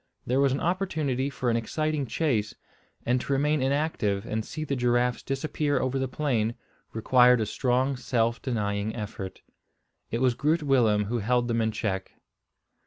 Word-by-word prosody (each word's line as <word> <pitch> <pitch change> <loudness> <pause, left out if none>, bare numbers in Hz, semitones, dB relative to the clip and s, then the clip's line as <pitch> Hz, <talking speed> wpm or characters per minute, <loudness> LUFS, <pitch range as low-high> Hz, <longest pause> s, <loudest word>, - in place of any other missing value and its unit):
There 130 +2 +1
was 140 -1 +4
an 135 - 0
opportunity 155 -7 -1
for 130 -3 -1
an - - +1
exciting 150 +5 -1
chase; 115 -8 0 0.5
and 125 +1 +2
to 140 - -2
remain 150 +1 +2
inactive 135 -8 0
and 110 0 -2
see 155 - -5
the 140 -2 -2
giraffes 125 -1 +1
disappear 145 +1 -1
over 130 +1 -1
the 130 - 0
plain, 120 -5 -1 0.4
required 125 +2 +5
a 110 - 0
strong 130 +4 0
self 120 -2 0
denying 105 -4 -2
effort. 105 -4 -6 0.7
It 115 - -2
was 130 -1 +3
Groot 150 +6 +1
Willem 115 -7 +3
who 120 +3 -1
held 120 +3 +1
them 115 -1 +1
in 110 0 +1
check. 95 -3 -3
125 Hz, 165 wpm, -27 LUFS, 115-140 Hz, 0.7 s, required